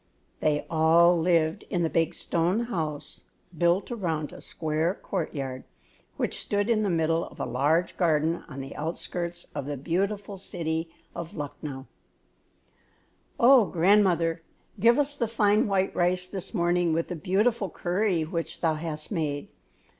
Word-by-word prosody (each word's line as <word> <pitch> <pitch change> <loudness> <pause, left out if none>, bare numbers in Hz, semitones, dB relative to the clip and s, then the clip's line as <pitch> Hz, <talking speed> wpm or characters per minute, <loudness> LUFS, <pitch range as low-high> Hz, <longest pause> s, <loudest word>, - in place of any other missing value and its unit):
They 150 -1 +1
all 165 +2 +5
lived 165 -1 +2
in 175 -2 0
the - - +3
big 165 -1 +1
stone 175 +6 0
house, 160 -11 -4 0.3
built 175 +7 +2
around 165 -9 -2
a - - -10
square 160 +3 -1
courtyard, 135 -3 -4 0.5
which - - -1
stood 205 +2 0
in 215 -2 +3
the 205 - +1
middle 165 -1 +1
of - - -14
a - - -1
large 155 +8 +1
garden 165 -1 +1
on 135 -1 -6
the 135 - -8
outskirts 170 +2 -4
of 140 - -4
the 145 -1 -3
beautiful 195 +7 -2
city 165 -3 -2 0.2
of 170 -1 -7
Lucknow. 145 -2 -6 1.5
"Oh, 245 -2 +7
grandmother, 175 -3 +3 0.4
give 235 +4 +5
us 290 0 +2
the 235 - 0
fine 210 -1 +3
white 195 -1 0
rice 180 +1 +1
this 190 -1 -4
morning 175 -3 +1
with 165 +1 -1
the 180 - -3
beautiful 200 +5 +1
curry 180 -1 0
which 165 +1 -4
thou 165 -2 +2
hast 155 +1 -5
made! 150 -6 -2
170 Hz, 145 wpm, -27 LUFS, 160-195 Hz, 1.5 s, Oh